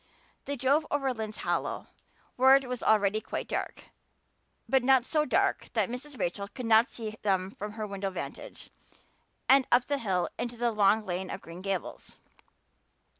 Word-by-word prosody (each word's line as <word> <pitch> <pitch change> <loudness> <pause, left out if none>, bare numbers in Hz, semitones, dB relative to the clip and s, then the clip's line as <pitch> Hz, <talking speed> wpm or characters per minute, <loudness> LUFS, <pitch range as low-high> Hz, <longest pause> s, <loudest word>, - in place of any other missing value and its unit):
They 285 - -3
drove 280 +4 +2
over 275 -2 0
Lynde's 220 -2 -5
Hollow, - - -1 0.5
where 265 +1 +7
it 275 -1 +1
was 250 -1 -4
already 215 0 +3
quite - - -5
dark, - - -4 0.8
but 265 -1 +3
not 260 -1 +4
so 305 +1 +1
dark - - +1
that - - +1
Mrs. 265 +2 -7
Rachel 200 +3 -2
could 250 +4 -7
not 225 +1 +5
see 220 -2 -6
them 190 -2 0
from 210 +1 -7
her 215 -1 -4
window 200 -1 -3
vantage, 185 - -8 0.8
and 270 0 +5
up 245 +1 +5
the 285 -1 -1
hill 185 -6 0
and 240 - -2
into 240 - -13
the 240 0 +1
long 210 0 +3
lane 185 0 -3
of - - -5
Green 170 +2 -10
Gables. 195 -2 -4
225 Hz, 175 wpm, -29 LUFS, 200-260 Hz, 0.8 s, where